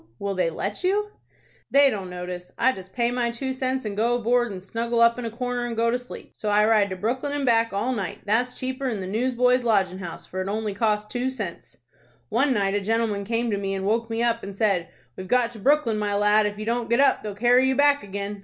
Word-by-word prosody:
Will 200 Hz, 0 st, -3 dB
they 185 Hz, -3 st, +1 dB
let 195 Hz, -, -4 dB
you?" 415 Hz, +3 st, +1 dB, 0.6 s
"They 280 Hz, -1 st, +6 dB
don't 195 Hz, -4 st, -5 dB
notice. 180 Hz, 0 st, -7 dB
I 260 Hz, +3 st, +4 dB
just 190 Hz, -5 st, -10 dB
pay 240 Hz, -1 st, 0 dB
my 245 Hz, -1 st, 0 dB
two 260 Hz, +3 st, -3 dB
cents, 260 Hz, -1 st, -2 dB
and 205 Hz, -1 st, -3 dB
go 230 Hz, +3 st, +2 dB
aboard, 240 Hz, 0 st, +1 dB
and 185 Hz, -2 st, -7 dB
snuggle 230 Hz, +3 st, -2 dB
up 235 Hz, +1 st, +4 dB
in 245 Hz, -, -4 dB
a -, -, -2 dB
corner 245 Hz, +1 st, -3 dB
and 230 Hz, -1 st, -5 dB
go 230 Hz, 0 st, +2 dB
to 245 Hz, -, 0 dB
sleep. 245 Hz, -, -11 dB
So 215 Hz, -, -4 dB
I 210 Hz, +1 st, +4 dB
ride 215 Hz, -2 st, +3 dB
to 185 Hz, -, -4 dB
Brooklyn 250 Hz, +9 st, -2 dB
and 290 Hz, -1 st, -1 dB
back 230 Hz, -2 st, +3 dB
all 205 Hz, +6 st, -1 dB
night. 200 Hz, -7 st, -4 dB
That's 240 Hz, +4 st, +1 dB
cheaper'n 260 Hz, -3 st, -3 dB
the 190 Hz, -, -4 dB
Newsboys' 250 Hz, +4 st, +1 dB
Lodgin' 195 Hz, -5 st, +1 dB
House, 175 Hz, -3 st, -7 dB
for 185 Hz, -, -5 dB
it 185 Hz, -, -4 dB
only 215 Hz, 0 st, -2 dB
costs 210 Hz, 0 st, 0 dB
two 245 Hz, +3 st, -2 dB
cents. 210 Hz, -10 st, -7 dB, 0.5 s
One 270 Hz, +5 st, +2 dB
night 200 Hz, -5 st, +1 dB
a 205 Hz, -, 0 dB
gentleman 215 Hz, -1 st, 0 dB
came 230 Hz, +2 st, -1 dB
to 200 Hz, -, -1 dB
me, 195 Hz, -1 st, -2 dB
and 190 Hz, 0 st, -3 dB
woke 230 Hz, +3 st, 0 dB
me 225 Hz, +1 st, -1 dB
up, 235 Hz, -1 st, +1 dB
and 195 Hz, 0 st, -8 dB
said, 195 Hz, -6 st, +1 dB, 0.3 s
'We've 185 Hz, -, -7 dB
got 245 Hz, +1 st, +2 dB
to 230 Hz, -, -11 dB
Brooklyn, 245 Hz, -2 st, +2 dB
my 205 Hz, -1 st, -1 dB
lad. 210 Hz, +1 st, +4 dB
If 205 Hz, 0 st, -5 dB
you 215 Hz, -, -5 dB
don't 235 Hz, +1 st, -1 dB
get 235 Hz, +2 st, +2 dB
up 280 Hz, -, +4 dB
they'll 210 Hz, -2 st, -6 dB
carry 245 Hz, +4 st, +4 dB
you 265 Hz, -, +1 dB
back 285 Hz, +1 st, +4 dB
again.' 200 Hz, +1 st, -5 dB
225 Hz, 245 wpm, -24 LUFS, 200-245 Hz, 0.6 s, They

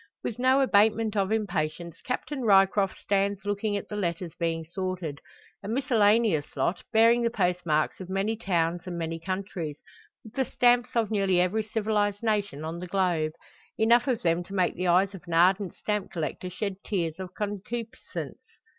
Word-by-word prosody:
With 235 Hz, -, -4 dB
no 260 Hz, +2 st, +4 dB
abatement 220 Hz, -2 st, +3 dB
of 195 Hz, 0 st, +1 dB
impatience 170 Hz, -6 st, -2 dB
Captain 265 Hz, +2 st, -3 dB
Ryecroft 195 Hz, -2 st, +4 dB
stands 200 Hz, 0 st, 0 dB
looking 205 Hz, 0 st, -1 dB
at 200 Hz, -, -6 dB
the 210 Hz, -, -6 dB
letters 170 Hz, -4 st, -2 dB
being 165 Hz, -1 st, -2 dB
sorted 175 Hz, -4 st, -4 dB, 0.4 s
a 200 Hz, -, -8 dB
miscellaneous 220 Hz, -, +2 dB
lot, 155 Hz, +7 st, 0 dB
bearing 230 Hz, +1 st, +5 dB
the 235 Hz, -, +2 dB
post 180 Hz, -5 st, -1 dB
marks 155 Hz, 0 st, +1 dB
of 185 Hz, -1 st, -8 dB
many 195 Hz, +4 st, 0 dB
towns 175 Hz, -4 st, -1 dB
and 175 Hz, -1 st, -4 dB
many 165 Hz, 0 st, -3 dB
countries, 185 Hz, -4 st, -4 dB, 0.5 s
with 220 Hz, -, -13 dB
the 265 Hz, -1 st, 0 dB
stamps 245 Hz, 0 st, +2 dB
of 225 Hz, -2 st, +1 dB
nearly 195 Hz, -4 st, +2 dB
every 185 Hz, +5 st, +2 dB
civilised 210 Hz, -1 st, -1 dB
nation 205 Hz, -9 st, -1 dB
on 165 Hz, +2 st, -4 dB
the 180 Hz, -, -6 dB
globe; 175 Hz, -5 st, 0 dB, 0.4 s
enough 235 Hz, +4 st, +4 dB
of 250 Hz, -4 st, 0 dB
them 170 Hz, 0 st, +2 dB
to 195 Hz, -, -8 dB
make 185 Hz, -2 st, +2 dB
the 180 Hz, +1 st, -2 dB
eyes 185 Hz, +3 st, +3 dB
of 190 Hz, -, -9 dB
an 170 Hz, -, -2 dB
ardent 185 Hz, +3 st, +3 dB
stamp 210 Hz, -2 st, -2 dB
collector 170 Hz, +2 st, -4 dB
shed 195 Hz, +1 st, -4 dB
tears 170 Hz, -4 st, -2 dB
of 185 Hz, -2 st, -7 dB
concupiscence. 215 Hz, +4 st, -5 dB
195 Hz, 170 wpm, -27 LUFS, 175-220 Hz, 0.5 s, bearing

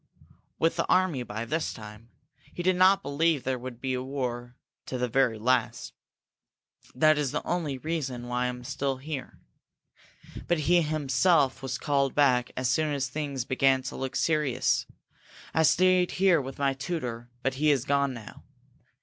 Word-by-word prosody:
"With 165 Hz, -, +1 dB
the -, -, 0 dB
army 185 Hz, -7 st, +2 dB
by 110 Hz, -1 st, -5 dB
this 155 Hz, +7 st, -2 dB
time! 105 Hz, +1 st, -11 dB, 0.5 s
He 175 Hz, -, -4 dB
did 185 Hz, +1 st, +3 dB
not 190 Hz, +2 st, +5 dB
believe 150 Hz, 0 st, +1 dB
there 130 Hz, -1 st, -2 dB
would 125 Hz, -1 st, -8 dB
be 130 Hz, 0 st, -2 dB
war, 125 Hz, -2 st, -4 dB, 0.3 s
to 130 Hz, -, -3 dB
the 125 Hz, 0 st, 0 dB
very 125 Hz, -2 st, +2 dB
last. 125 Hz, +4 st, 0 dB, 1.0 s
That 155 Hz, +3 st, +4 dB
is 145 Hz, -3 st, 0 dB
the -, -, -3 dB
only 160 Hz, -6 st, -2 dB
reason 135 Hz, -5 st, -3 dB
I 125 Hz, 0 st, 0 dB
am 125 Hz, 0 st, -5 dB
still 135 Hz, +2 st, -2 dB
here. 140 Hz, -1 st, -6 dB, 1.1 s
But 175 Hz, -3 st, +1 dB
he 175 Hz, +4 st, +4 dB
himself 150 Hz, -1 st, +2 dB
was 130 Hz, -1 st, -3 dB
called 140 Hz, -2 st, 0 dB
back 125 Hz, -4 st, +3 dB
as 130 Hz, 0 st, 0 dB
soon 155 Hz, +4 st, +1 dB
as 135 Hz, -2 st, -2 dB
things 140 Hz, -3 st, -3 dB
began 130 Hz, 0 st, +2 dB
to 130 Hz, -, -6 dB
look 130 Hz, -1 st, -4 dB
serious. 150 Hz, -6 st, +1 dB, 0.7 s
I 160 Hz, -, +3 dB
stayed 180 Hz, +3 st, +3 dB
here 180 Hz, -4 st, +3 dB
with 135 Hz, 0 st, -8 dB
my 140 Hz, -1 st, +1 dB
tutor 125 Hz, -5 st, -5 dB
but 135 Hz, -, 0 dB
he 155 Hz, -, +4 dB
is 140 Hz, -3 st, +2 dB
gone 140 Hz, -2 st, +1 dB
now. 110 Hz, -3 st, -11 dB
135 Hz, 165 wpm, -27 LUFS, 125-155 Hz, 1.1 s, not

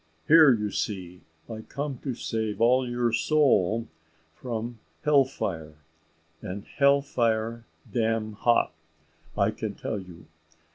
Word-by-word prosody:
Here, 155 Hz, -3 st, +8 dB
you 105 Hz, -4 st, 0 dB
see, 90 Hz, -4 st, -4 dB, 0.3 s
I 110 Hz, -1 st, -7 dB
come 140 Hz, +2 st, -5 dB
to 130 Hz, -4 st, -4 dB
save 110 Hz, -3 st, -3 dB
all 125 Hz, +2 st, +3 dB
your 120 Hz, -1 st, 0 dB
soul 115 Hz, -, +2 dB, 0.5 s
from 115 Hz, +2 st, -5 dB, 0.2 s
hell 145 Hz, -3 st, +5 dB
fire; 80 Hz, -, -5 dB, 0.7 s
and 100 Hz, +2 st, -6 dB
hell 140 Hz, 0 st, +3 dB
fire 115 Hz, -3 st, -1 dB, 0.3 s
dam 110 Hz, -2 st, 0 dB
hot, 120 Hz, +3 st, +2 dB, 0.6 s
I -, -, +3 dB
can -, -, -5 dB
tell 105 Hz, -, -4 dB
you. 90 Hz, -4 st, -12 dB
115 Hz, 125 wpm, -27 LUFS, 105-130 Hz, 0.7 s, Here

